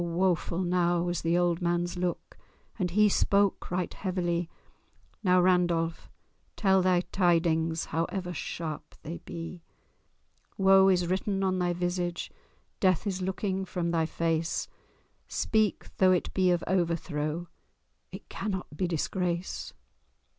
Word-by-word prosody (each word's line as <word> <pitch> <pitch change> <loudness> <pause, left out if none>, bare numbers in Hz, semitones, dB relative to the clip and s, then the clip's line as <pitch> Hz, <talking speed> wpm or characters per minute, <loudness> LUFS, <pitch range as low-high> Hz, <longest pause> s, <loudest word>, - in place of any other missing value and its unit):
woeful 175 0 0
now 175 -1 +2
was 175 -1 -2
the 165 +1 +2
old 175 -1 +1
man's 175 0 0
look, 180 -1 -3 0.4
And 180 -2 0
he 210 +4 +4
spake 200 0 +2
right 180 0 -2
heavily— 175 -3 -1 0.7
"Now, 180 -2 +5
Randolph, 175 -2 +1 0.5
tell 190 -2 +3
thy 180 -1 +3
tidings, 165 -3 +2
However 180 +3 -2
sharp 160 -3 -5
they 165 +3 -6
be! 165 +1 -7 1.0
Woe 195 0 +6
is 180 -2 +3
written 195 +2 -1
on 185 -1 +1
thy 175 -1 +1
visage, 175 0 -2 0.5
Death 185 0 +2
is 190 -2 -2
looking 190 +1 -2
from 175 -2 -2
thy 165 -2 +1
face; 165 0 -1 0.6
Speak! 215 -2 0
though 185 -1 +5
it 180 - -1
be 185 -1 +3
of 175 -1 +2
overthrow— 170 -2 -1 0.6
It - - -10
cannot 190 -6 -4
be 180 +4 0
disgrace!" 175 +1 -2
175 Hz, 125 wpm, -29 LUFS, 170-185 Hz, 1.0 s, Woe